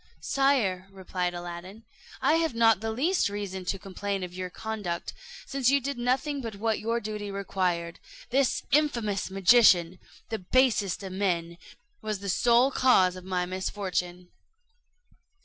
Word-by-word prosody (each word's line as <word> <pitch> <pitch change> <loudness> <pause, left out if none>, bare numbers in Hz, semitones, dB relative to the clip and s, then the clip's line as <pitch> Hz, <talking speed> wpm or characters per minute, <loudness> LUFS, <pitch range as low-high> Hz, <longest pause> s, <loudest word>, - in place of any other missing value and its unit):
"Sire," 235 -10 +1
replied 185 -2 -3
Aladdin, 175 +5 -8 0.4
"I 320 - +4
have 325 -6 0
not 225 -3 +4
the 225 - -2
least 285 - +1
reason 195 -2 -5
to 185 +2 -1
complain 195 0 -4
of 180 -1 -6
your 185 0 -5
conduct, 200 -4 -5 0.3
since 270 -2 +1
you 280 +1 +4
did 275 -1 -4
nothing 270 +4 0
but 225 -4 -6
what 220 +2 -1
your 230 +2 -1
duty 210 -1 -5
required. 185 -4 -2 0.3
This 265 0 +1
infamous 235 -11 +1
magician, 185 -3 +5 0.3
the 220 - -3
basest 210 -2 +1
of 190 - -6
men, 175 -3 -1 0.4
was 215 -1 -3
the 200 +1 -6
sole 240 +7 +4
cause 190 -10 +4
of 185 0 -10
my 180 -1 -1
misfortune." 180 -1 -3
200 Hz, 145 wpm, -27 LUFS, 185-235 Hz, 0.4 s, magician